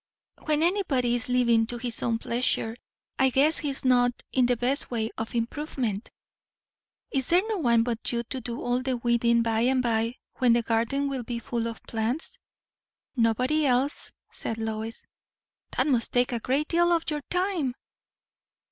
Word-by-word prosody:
"When 310 0 +2
anybody 325 -10 +1
is 245 +1 -1
living 235 -3 +3
to 240 - -4
his 240 -1 -4
own 230 -1 +1
pleasure, 235 -1 -1 0.4
I 265 - +5
guess 280 +5 +3
he 295 - -2
is 270 -1 -4
not 245 -1 +4 0.2
in 255 -2 +3
the 245 -1 +2
best 250 +4 +1
way 225 -2 -2
of 225 +2 -5
improvement." 235 -3 -2 1.0
"Is 265 -3 0
there 355 +2 +4
no 435 -3 -1
one 235 -6 +3
but 235 -1 -2
you 235 -1 -1
to 260 +2 -5
do 235 0 -5
all 245 +1 0
the 255 -1 -1
weeding, 235 0 +2
by 225 -1 +1
and 255 +3 +3
by, 230 0 0 0.2
when 245 -2 +5
the 235 0 +2
garden 235 +5 0
will 270 -2 -2
be 240 0 -4
full 235 0 -2
of 230 -1 -7
plants?" 230 +7 -3 0.8
"Nobody 250 +6 +2
else," 260 +3 0 0.2
said 225 - -4
Lois. 220 0 -4 0.7
"That - - +3
must 250 -6 +1
take 245 0 +3
a 240 - -1
great 270 +6 0
deal 345 +1 +3
of 335 -1 +2
your 300 -1 -2
time!" 360 -8 0
245 Hz, 175 wpm, -27 LUFS, 230-275 Hz, 1.0 s, I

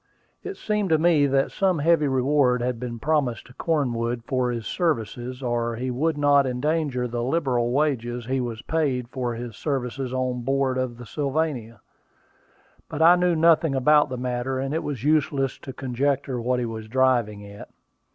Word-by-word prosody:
It 400 - -6
seemed 210 -3 -1
to 160 - +4
me 155 -3 +4
that 135 0 +1
some 190 -3 +1
heavy 155 0 +3
reward 130 -2 +2
had 125 -1 -2
been 120 -1 -5
promised 140 -3 0
to 125 - -16
Cornwood 120 -7 -1
for 130 -1 0
his 115 -2 -4
services, 125 - -2
or 120 -1 -1
he 125 +2 -3
would 150 +5 0
not 145 -1 +4
endanger 130 -1 -1
the 120 0 -3
liberal 125 -3 0
wages 125 -4 -1
he 130 +1 -1
was 120 0 -5
paid 135 -7 -1
for 125 -3 -3
his 120 -2 -7
services 135 -2 -3
on 130 -1 -2
board 135 0 0
of 125 -2 -3
the 120 - -10
Sylvania. 135 -5 -2 1.1
But 160 - -1
I 170 +2 +8
knew 180 -1 +2
nothing 160 -2 +4
about 150 +3 +4
the 130 - -4
matter, 125 +1 -2
and 135 +2 -2
it 160 - 0
was 135 -6 -5
useless 145 -3 +1
to 135 - -8
conjecture 135 0 -1
what 125 +2 0
he 120 - -1
was 110 -1 -6
driving 120 -4 +1
at. 100 0 -11
130 Hz, 175 wpm, -24 LUFS, 120-150 Hz, 1.1 s, I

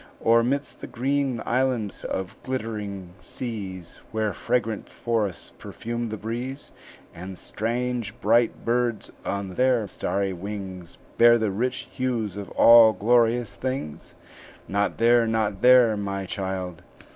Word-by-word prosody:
Or 115 +1 +4
midst 140 +4 -2
the - - -6
green 135 0 -1
islands 125 -4 -1
of 95 0 -4
glittering 105 -7 -5
seas, 95 -4 -6
Where 110 -2 -1
fragrant 115 -2 -2
forests 110 -6 -2
perfume 120 0 -5
the 110 - -4
breeze, 120 +6 -5 0.4
And 95 +2 -8
strange 120 +1 -3
bright 115 +2 +2
birds 120 -2 0
on 100 -1 -3
their 125 -1 +2
starry 100 0 -2
wings 95 -2 -7 0.2
Bear 120 0 +7
the 110 -3 0
rich 125 +6 -2
hues 115 -6 -2
of 100 -1 -6
all 115 -1 +8
glorious 115 -1 +2
things?" 130 - -5 0.5
"Not 100 +1 0
there, 120 0 +4
not 110 -3 -1
there, 125 -3 +6
my 100 -1 -3
child!" 95 -2 -4
110 Hz, 125 wpm, -25 LUFS, 100-120 Hz, 0.5 s, all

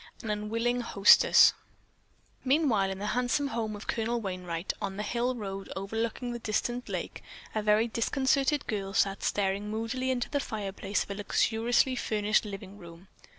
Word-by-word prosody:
AN 220 - -2
UNWILLING 230 +4 -1
HOSTESS 205 -3 +6 0.9
Meanwhile 260 -8 +2
in 190 - -4
the 200 - -5
handsome 250 +3 0
home 220 -3 -3
of 205 - -9
Colonel 235 +1 -1
Wainright, 180 -4 -4
on 195 -1 -3
the 210 - -2
hill 240 +4 -1
road 195 -3 -6
overlooking 225 +5 -3
the 240 - -5
distant 240 +3 -2
lake, - - -4 0.3
a 215 - 0
very 210 +2 +3
discontented 270 +5 +1
girl 195 -2 -3
sat 195 -2 +2
staring 200 +1 -1
moodily 230 +4 -2
into 250 -2 0
the 285 - -1
fireplace 205 -4 -3
of - - -10
a - - -1
luxuriously 225 +5 +1
furnished 215 -2 +1
living 200 0 -8
room. 170 +1 -13
215 Hz, 155 wpm, -29 LUFS, 200-240 Hz, 0.9 s, HOSTESS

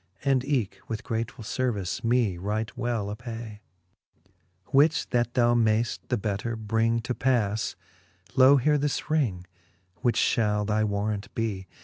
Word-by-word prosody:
And 135 -2 +3
eke 120 -9 -1
with 110 0 -4
gratefull 115 0 -4
lervice 105 -7 -2
me 115 -5 +2
right 105 +2 -3
well 115 -4 -2
apay, 115 -2 -8
XXXIV. 90 -1 -41 0.4
Which 155 +4 +4
that 120 0 0
thou 120 -2 +4
mayft 115 0 +2
the 125 - 0
better 105 +2 -2
bring 115 +1 0
to 125 +2 -3
pas, 110 -5 0 0.6
Loe 135 +1 +7
here 150 +3 +2
this 145 +1 -2
ring, 110 - 0 0.5
which 120 -3 +1
fhall 105 -2 +2
thy 110 +1 +1
warrant 100 0 -1
bee. 100 -5 -2
115 Hz, 140 wpm, -27 LUFS, 105-125 Hz, 0.6 s, Loe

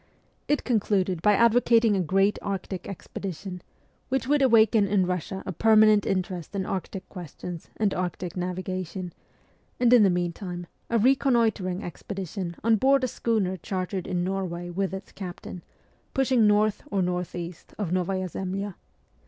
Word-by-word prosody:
It 295 - +1
concluded 195 -7 +1
by 210 +4 +5
advocating 230 -1 +4
a - - +1
great 195 +4 +2
Arctic 195 -2 -4
expedition, 190 -1 -6 0.5
which 265 0 0
would 290 +1 +3
awaken 225 -4 +5
in 195 -1 +2
Russia 180 +1 -3
a - - -3
permanent 215 +2 +5
interest 185 -1 -2
in 190 -1 -1
Arctic 190 0 -4
questions 175 -1 -8
and 210 -2 +1
Arctic 180 -1 -3
navigation, 185 0 -4 0.7
and 245 0 +5
in 245 - +8
the 200 - +6
meantime 175 0 -3 0.2
a 235 - +2
reconnoitring 225 -6 +2
expedition 185 0 -5
on 225 0 +4
board 270 +4 +3
a - - +2
schooner 215 -6 0
chartered 185 0 -3
in 175 -1 -1
Norway 180 -2 -3
with 190 +2 -1
its 190 0 -7
captain, 180 -1 -8 0.5
pushing 260 -4 +4
north 210 0 +3
or 195 -2 +1
north 180 0 -2
east 175 -1 -7
of 200 -6 -2
Novaya 185 +1 0
Zemlya. 195 +3 -4
195 Hz, 145 wpm, -26 LUFS, 180-215 Hz, 0.7 s, in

